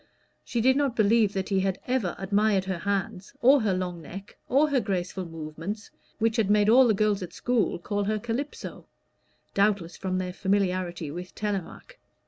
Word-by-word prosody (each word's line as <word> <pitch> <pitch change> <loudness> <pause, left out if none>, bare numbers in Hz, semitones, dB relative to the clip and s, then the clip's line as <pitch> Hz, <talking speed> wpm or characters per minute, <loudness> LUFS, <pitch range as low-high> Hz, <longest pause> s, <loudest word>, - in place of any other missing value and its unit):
She 235 - -2
did 260 +3 +4
not 280 -4 +1
believe 215 -1 +3
that 190 -1 -2
he 195 -2 +2
had 190 0 0
ever 245 -8 0
admired 200 0 +1
her 190 -2 -3
hands, 195 +1 -3
or 270 +1 +6
her 215 -3 +1
long 180 -2 -3
neck, 195 +6 -10
or 285 +4 +4
her 275 - +3
graceful 190 -3 -2
movements, 165 +6 -6 0.3
which 225 0 +1
had 215 -3 +2
made 210 0 +4
all 250 +2 +7
the 220 - +3
girls 210 -1 +1
at 180 -2 -6
school 245 -3 0
call 205 +3 -2
her 215 +1 0
Calypso 240 +7 -5 0.7
(doubtless 200 -4 +1
from 185 -1 -2
their 180 -1 -3
familiarity 185 -5 -1
with 180 +3 -8
"Telémaque"). 210 - -5
200 Hz, 175 wpm, -27 LUFS, 185-225 Hz, 0.7 s, all